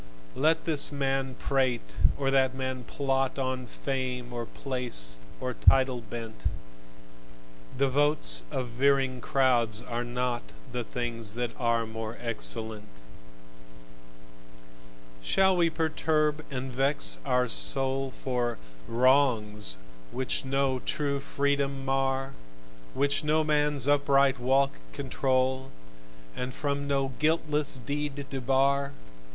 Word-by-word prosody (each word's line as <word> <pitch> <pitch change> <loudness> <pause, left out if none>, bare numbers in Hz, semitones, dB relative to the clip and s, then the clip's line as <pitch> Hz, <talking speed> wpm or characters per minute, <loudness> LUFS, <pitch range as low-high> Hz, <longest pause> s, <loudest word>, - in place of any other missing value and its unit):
Let 160 +3 +2
this 150 -3 +4
man 135 -2 -1
prate 130 -4 -1 0.2
and 140 - -2
that 130 -1 +3
man 130 -1 -4
plot, 135 -1 -1
On 130 -1 -2
fame 125 -1 -4
or 120 -1 -4
place 120 - -1 0.2
or 130 0 -3
title 130 0 +4
bent: 115 0 -8 1.3
The 140 +1 +3
votes 135 - +3
of 125 - -3
veering 135 +1 +1
crowds 120 -5 +2
are 120 -1 -3
not 125 0 -2 0.3
The 125 -1 -2
things 115 -3 -4
that 120 -1 -2
are 115 -2 +1
more 110 0 -6
excellent. 110 -2 0 2.3
Shall 190 - +3
we 170 -1 +3
perturb 155 -1 0
and 130 -1 -5
vex 130 - +1
our 125 - +2
soul 135 +2 +1
For 125 -2 -2 0.3
"wrongs" 115 - +2 0.3
which 130 +1 -2
no 135 -1 0
true 140 +1 -2
freedom 140 -1 -1
mar, 135 0 0 0.6
Which 140 +1 +1
no 155 +1 +2
man's 150 -3 +2
upright 140 -2 +3
walk 135 +3 +2
control, 130 -1 0 0.7
And 125 0 -4
from 140 -1 -2
no 135 -1 +1
guiltless 150 -2 +1
deed 145 +1 -4
debar? 135 +1 +1
135 Hz, 110 wpm, -28 LUFS, 125-140 Hz, 2.3 s, this